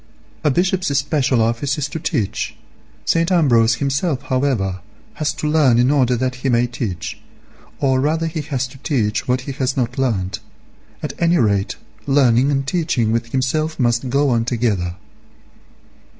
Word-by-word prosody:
A 150 - +3
Bishop's 185 +4 +1
special 135 -4 +1
office 120 +6 0
is 145 -1 -1
to 160 - -5
teach; 125 - -2 0.5
St. 165 +2 +2
Ambrose 120 -10 +4
himself, 140 +2 -1
however, 130 -9 0 0.4
has 150 - +2
to 150 - -3
learn 150 -6 +4
in 125 +3 +4
order 130 -4 +3
that 130 +1 -2
he 135 - 0
may 120 0 +3
teach; 115 -8 -5 0.6
or 130 -2 +2
rather 160 +3 +1
has 150 -5 -2
to 135 - -14
teach 110 -8 -1
what 125 0 +1
he 140 - -6
has 130 0 -2
not 125 0 -1
learnt; 100 -8 -1 0.6
at - - -3
any 170 +1 +4
rate 100 - +1 0.3
learning 135 -2 +4
and 135 -1 0
teaching 145 -8 0
with 115 +1 0
himself 150 +6 -1
must 120 +1 +1
go 140 +2 +2
on 115 -1 +2
together. 110 -8 -1
130 Hz, 155 wpm, -19 LUFS, 115-145 Hz, 0.6 s, Ambrose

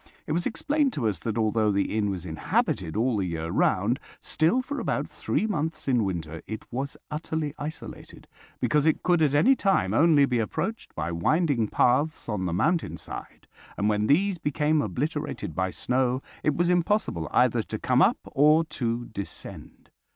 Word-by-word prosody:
It - - -5
was 170 +3 0
explained 290 +3 0
to 120 -6 -1
us 100 -6 -1
that, 110 +3 -3
although 110 -1 +2
the 100 +1 0
inn 105 -2 +1
was 95 -3 -4
inhabited 80 -1 -1
all 120 0 +1
the 100 - 0
year 80 -1 -3
round, 105 - +2 0.2
still 225 +12 +1
for 285 +2 -4
about - - -1
three - - -1
months 160 -8 -3
in 125 -4 +3
winter 80 -4 -4
it 110 0 -6
was 135 +3 -3
utterly 155 -1 -3
isolated, 150 +2 -8 0.3
because 150 0 +2
it 160 - +2
could 175 -2 +3
at 145 -2 +3
any 250 - +5
time 150 - +1
only 150 +2 +5
be 125 -3 0
approached 165 - -3
by 80 +1 -2
winding 130 - +1
paths 140 +9 +1
on 105 -5 -2
the - - -2
mountain 155 - 0
side, - - -9 0.3
and 105 +1 +1
when 105 0 +1
these 185 +5 +2
became 150 0 +1
obliterated 150 - -3
by 95 +4 0
snow 125 +5 0 0.2
it 150 - +1
was 175 +2 +2
impossible 175 - 0
either - - +3
to - - -5
come - - +2
up - - +4
or 150 +3 +5
to 120 -6 -3
descend. 100 -3 -9
135 Hz, 175 wpm, -26 LUFS, 105-160 Hz, 0.3 s, any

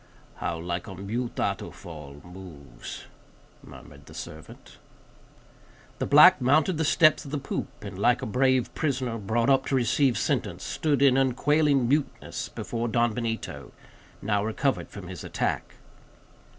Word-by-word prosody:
"How 85 - -3
like 85 +3 -4
a 95 - -8
mute 115 +6 -4
Atufal 75 -4 -5
moves," 90 -6 -10 0.6
murmured - - -14
the - - -13
servant. 80 0 -10 1.2
The - - -1
black 150 +3 +8
mounted 155 +6 +3
the - - +2
steps 155 +1 +4
of 140 - -9
the 145 - -2
poop, 135 - -4 0.2
and, 100 -2 -7
like 120 +4 +2
a - - -1
brave 130 +1 +1
prisoner, 130 -6 -2
brought 115 +6 +1
up 135 0 +2
to 135 - +1
receive 125 0 +2
sentence, - - -1
stood 145 -3 0
in 135 -2 +5
unquailing 135 +1 +2
muteness 145 +2 -2
before 120 0 -4
Don 120 0 +1
Benito, 115 -1 -4 0.5
now 100 -1 +1
recovered 130 +5 -1
from 100 -4 -9
his 90 -3 -8
attack. - - -3
120 Hz, 140 wpm, -26 LUFS, 100-140 Hz, 1.2 s, black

